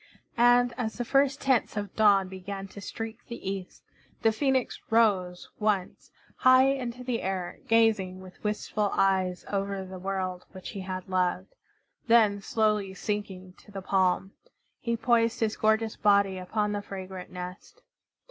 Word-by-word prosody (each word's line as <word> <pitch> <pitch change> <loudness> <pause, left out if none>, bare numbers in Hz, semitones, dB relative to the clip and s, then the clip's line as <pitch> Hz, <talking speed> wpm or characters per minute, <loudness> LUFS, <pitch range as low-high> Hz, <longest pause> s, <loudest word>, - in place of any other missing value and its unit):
And 245 0 +5
as 220 -3 -2
the 245 - -2
first 275 +2 +2
tints 260 -5 +1
of 205 -2 -4
dawn 200 -3 +5
began 195 +1 -7
to 200 - -10
streak 225 +3 -6
the 235 - -7
east, 195 -1 -5 0.4
the 225 - +5
Phoenix 265 +2 0
rose 195 -6 +2
once, 210 -4 -1 0.3
high 255 +1 +6
into 250 -2 -3
the 245 -2 -2
air, 185 -2 -3
gazing 220 -5 +2
with 185 -1 -14
wistful 210 0 -1
eyes 190 -2 +1
over 195 -1 -2
the 185 0 -8
world 185 -1 -3
which 185 -1 -8
he 200 - -6
had 185 -1 -5
loved; 185 - -1 0.5
then, 215 -4 +4
slowly 210 -2 0
sinking 190 -3 -4
to - - -19
the 195 -1 -7
palm, 190 0 +1 0.5
he 235 -1 -1
poised 230 -1 +2
his 220 -1 0
gorgeous 220 0 +1
body 200 -2 +3
upon 210 +3 -1
the 205 0 -2
fragrant 190 -2 -8
nest. 180 - -9
205 Hz, 150 wpm, -28 LUFS, 190-225 Hz, 0.5 s, high